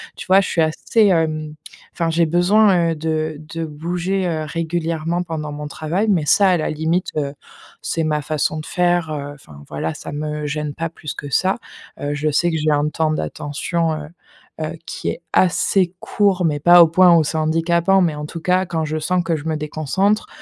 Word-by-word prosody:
Tu - - -9
vois, 190 +1 +6
je - - -3
suis 165 - +1
assez, 160 +7 +2
hem, 155 -4 0 0.4
enfin 165 -1 -1
j'ai 165 +1 +3
besoin, 175 0 +4
heu, - - -2
de 155 -1 -2
de 165 +1 -6
bouger, 175 +5 -2
heu, 160 -2 -2
régulièrement 165 +1 -2
pendant 155 -3 -5
mon 150 0 -6
travail, 160 +8 -2
mais 170 -7 +2
ça, 195 +4 +5
à 180 - +3
la 155 - -2
limite, 160 +4 -1
heu, 140 -2 -1 0.5
c'est 165 - -2
ma 150 -1 0
façon 155 +1 -1
de 155 - -7
faire, 175 -2 +1
heu, 145 -1 -4
enfin 75 - -15
voilà, 75 +2 -3
ça - - -8
me 150 +1 -4
gêne 150 0 -3
pas 165 0 -3
plus 155 -2 -7
que 145 - -7
ça. 190 +5 +2 0.5
Heu, 145 0 -2
je 155 +1 0
sais 175 +4 +2
que 160 - -1
j'ai 155 0 0
un 145 +1 +1
temps 155 0 0
d'attention, 155 - -2
heu, 150 -1 -7 0.5
heu, 155 +1 -3
qui - - -6
est - - -5
assez 185 0 +2
court, 195 -3 +1
mais 150 -2 0
pas 175 +3 +8
au 165 - +4
point 175 +1 +6
où 160 - +4
c'est 160 +2 -2
handicapant 170 +4 +2
mais 170 -4 +2
en 150 - -5
tout 165 +2 -7
cas, 185 +1 +2
quand 165 -2 -2
je 155 +1 -2
sens 180 +3 0
que 165 -1 0
je 145 - -9
me 160 -1 -1
déconcentre, 155 +8 0
160 Hz, 210 wpm, -20 LUFS, 150-175 Hz, 0.5 s, pas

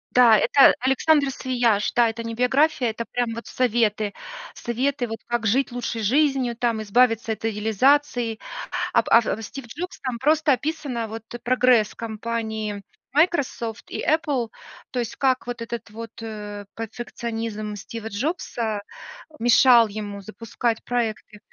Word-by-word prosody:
Да, 240 -3 +7
это 275 +6 +6
Александо 275 +2 +3
Свияш, 240 -6 +1
да, 240 -1 +4
это 225 +1 -5
не 230 0 -4
биография, 255 +1 +2
это 230 +1 -4
прям 240 +1 -2
вот 230 +1 -7
советы. 220 -4 +1 0.4
Советы, 250 +2 -1
вот, 225 0 -6
как 240 -2 -1
жить 260 +5 +2
лучшей 240 -1 -3
жизнью, 260 +1 +2
там, 230 -2 0
избавиться 225 +1 +2
от 220 0 -4
идеализации. 225 +3 +2 0.6
Об - - +2
от 225 -1 +3
Стив 270 +3 -8
Джобс, 335 +10 -7
там 255 -3 -3
просто 300 +3 +3
описано, 265 -4 -2
вот, 225 0 -7 0.2
прогресс 245 -3 +3
компании 220 -2 -4 0.3
Microsoft 280 -7 0
и - - -3
Apple, 285 -6 +1 0.4
то 255 - -3
есть, 240 -2 -2
как 260 -2 +1
вот 245 -1 -5
этот 230 0 -6
вот, 225 +1 -8
э, 210 -2 -6
перфекционизм 225 -2 -5
Стива 220 +2 -7
Джобса 225 - -2 0.6
мешал 240 0 +6
ему 205 -1 -6
запускать 225 +2 -3
проекты. 225 -3 -3
235 Hz, 135 wpm, -23 LUFS, 220-255 Hz, 0.6 s, Да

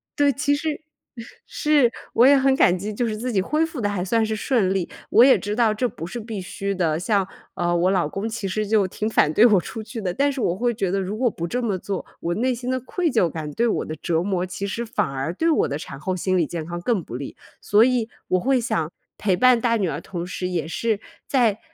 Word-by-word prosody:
对， 285 -1 +4
其 285 +3 +1
实， 300 +1 -3 0.6
是。 295 -6 +2 0.2
我 235 - +5
也 280 +2 +7
很 270 0 +3
感 180 - +4
激， 205 +4 -4
就 235 +3 -1
是 215 - -2
自 245 +4 -3
己 205 - +1
恢 305 +11 +1
复 320 -4 -7
得 205 - 0
还 200 -3 -2
算 225 +4 +1
是 220 0 -2
顺 215 -4 +1
利， 190 -3 -2 0.2
我 235 - +7
也 265 0 +7
知 205 +1 -3
道 230 -2 +3
这 245 +4 0
不 165 - -7
是 240 +6 -6
必 220 -3 -5
须 195 +2 -4
的， 165 -5 0
像， 200 0 +1 0.3
呃， 175 -1 0
我 175 +2 +2
老 180 -6 +1
公 195 +6 -3
其 225 -3 -4
实 210 +2 -2
就 205 -2 +3
挺 210 +3 -3
反 150 - +3
对 210 +9 +5
我 205 -7 +5
出 220 - -7
去 225 +1 -7
的， 185 -3 -1
但 285 +5 +2
是 270 -2 -4
我 175 - +1
会 240 +4 0
觉 195 -4 -1
得 195 +2 0
如 195 +2 -3
果 245 +1 +2
不 170 -5 -5
这 250 +8 -2
么 210 -5 -1
做， 195 +1 -4 0.2
我 170 - -2
内 255 +5 +1
心 245 +2 -4
的 260 - 0
愧 325 +6 -1
疚 200 -8 +2
感 155 -2 -5
对 235 +10 +1
我 225 - 0
的 155 - -5
折 165 0 0
磨， 185 -2 -1
其 185 +2 -5
实 215 +4 -3
反 210 -4 -1
而 135 +3 -3
对 325 - +1
我 - - +2
的 140 - -3
产 140 -2 -8
后 185 +5 -2
心 185 +1 0
理 165 - +2
健 165 -2 -5
康 175 +1 -5
更 205 -2 0
不 120 - -8
利。 135 +2 -6 0.3
所 210 +2 +4
以 245 -3 +1 0.2
我 185 - +3
会 265 +6 +2
想 165 - -1 0.3
陪 195 -3 +2
伴 250 0 +5
大 230 -1 +2
女 195 -4 0
儿， 150 0 -3
同 175 -1 -5
时 180 0 -4
也 170 -4 -2
是 215 +5 -1 0.3
在 230 -6 +2
210 Hz, 280 characters per minute, -23 LUFS, 180-240 Hz, 0.6 s, 也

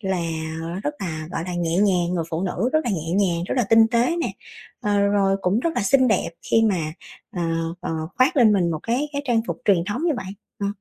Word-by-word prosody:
là 190 -3 -1 0.7
rất 295 - -1
là, 160 -4 -4
gọi - - -2
là, 180 - -4
nhẹ 170 -1 -1
nhàng, 180 -3 +2
người 165 -2 -1
phụ 165 +3 -2
nữ 225 +6 -1
rất 310 - +4
là 240 - 0
nhẹ 165 -3 -3
nhàng, 180 -3 +1
rất - - -2
là 240 - +3
tinh 225 0 +7
tế 245 +8 +2
nè. 340 - -2 0.5
Ờ, 205 -1 +1
rồi 200 -1 +2
cũng 190 +6 +2
rất 335 - 0
là - - 0
xinh 260 +2 +4
đẹp 210 - +1 0.2
khi 225 - +4
mà, 175 -8 0 0.4
ờ, 175 - -1 0.4
ờ, - - -4 0.3
khoác 255 +3 +3
lên 230 -5 +6
mình 180 -4 +2
một 155 -2 -3
cái 255 +6 -1
cái 285 0 -2
trang 240 -4 +2
phục - - -3
truyền 185 -5 +3
thống 205 +8 -3
như 335 - +2
vậy. 190 -2 -6 0.3
Ờ. 200 - 0
200 Hz, 240 wpm, -23 LUFS, 175-235 Hz, 0.7 s, tinh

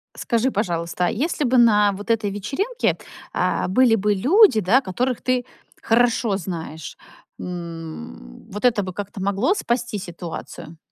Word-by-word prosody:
Скажи, 235 +3 0
пожалуйста, 175 -4 -1
а - - +2
если 300 +5 -1
бы 255 0 +2
на 210 -4 +5
вот 205 +4 -4
этой 215 -3 +1
вечеринке, 275 - -1 0.4
а, - - 0
были 230 +4 +4
бы 210 0 +1
люди, 285 - +5
да, 220 +8 +3
которых 245 +5 -2
ты 255 -1 0 0.4
хорошо 230 -3 +2
знаешь. 160 -4 -6 0.4
М, 165 - -8
вот 210 +2 -6
это 235 -5 +3
бы 185 -1 -6
как-то 205 +1 -6
могло 200 - +1
спасти 235 - -2
ситуацию? 170 -2 -8
205 Hz, 145 wpm, -22 LUFS, 180-245 Hz, 0.4 s, на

